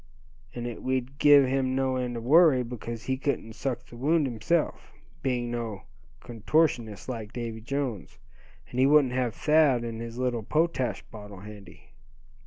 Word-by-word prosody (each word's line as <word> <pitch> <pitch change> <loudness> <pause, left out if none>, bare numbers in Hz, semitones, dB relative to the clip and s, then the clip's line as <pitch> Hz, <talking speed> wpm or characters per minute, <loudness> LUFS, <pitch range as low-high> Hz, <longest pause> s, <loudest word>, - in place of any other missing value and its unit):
And 120 -1 -4
it 120 -2 -5
w'd 130 +1 -3
give 145 -2 +7
him 130 0 0
no 130 -1 0
end 125 -2 -2
of 115 - -6
worry, 145 -1 +5
because 115 -1 -7
he 130 +1 -1
couldn't 130 -5 -2
suck 120 +1 -4
the - - -14
wound 150 +5 +2
himself, 135 +7 -1 0.3
being 120 -3 -1
no 115 -4 -4 0.4
contortionist 120 - 0
like 115 -5 -5
Davy 115 -2 -5
Jones; 130 -4 -4 0.5
and 125 - -3
he 130 - +5
wouldn't 145 -3 +4
have 125 -3 -1
Thad 150 -6 +3
and 115 -1 -5
his 115 0 -7
little 125 -2 -1
potash 155 +1 0
bottle 105 -3 -10
handy." 100 -5 -13
125 Hz, 160 wpm, -27 LUFS, 115-135 Hz, 0.5 s, give